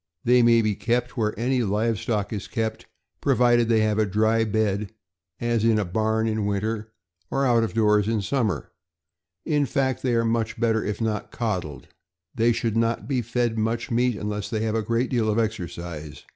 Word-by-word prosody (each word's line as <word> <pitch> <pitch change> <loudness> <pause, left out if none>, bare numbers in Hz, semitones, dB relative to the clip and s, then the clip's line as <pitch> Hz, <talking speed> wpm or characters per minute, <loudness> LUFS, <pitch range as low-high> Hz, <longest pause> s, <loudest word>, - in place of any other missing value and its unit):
They 125 +1 +5
may 115 -1 +5
be 105 -1 +1
kept 120 +4 -1
where 105 -3 -1
any 125 +2 +1
live 110 +1 0
stock 110 -1 -2
is 100 - -5
kept, 110 -2 -3 0.3
provided 120 -3 +3
they 110 -1 +4
have 110 0 +1
a 110 - +3
dry 110 +3 +2
bed, 105 -2 -1 0.5
as 120 -2 0
in 115 -1 +4
a 105 - 0
barn 110 +4 0
in 110 -2 -1
winter 105 +2 -2 0.4
or 135 0 0
out 120 -3 +4
of 110 - -3
doors 105 -2 +3
in 110 -2 0
summer; 115 -3 -1 0.7
in 145 -2 +1
fact, 130 +1 0
they 125 -2 +1
are 115 0 +2 0.3
better 115 -1 +1
if 105 +2 -3
not 110 -2 -2
coddled. 90 - -3 0.5
They 120 -1 +3
should 115 -1 -1
not 115 0 0
be 130 -3 0
fed 115 0 -1
much 115 +3 -1
meat 120 0 +2
unless 105 0 -4
they 110 -2 -2
have 110 -1 -1
a 110 - +1
great 115 +3 -1
deal 115 -4 +1
of 105 - +1
exercise. 85 -8 -4
110 Hz, 185 wpm, -24 LUFS, 105-120 Hz, 0.7 s, They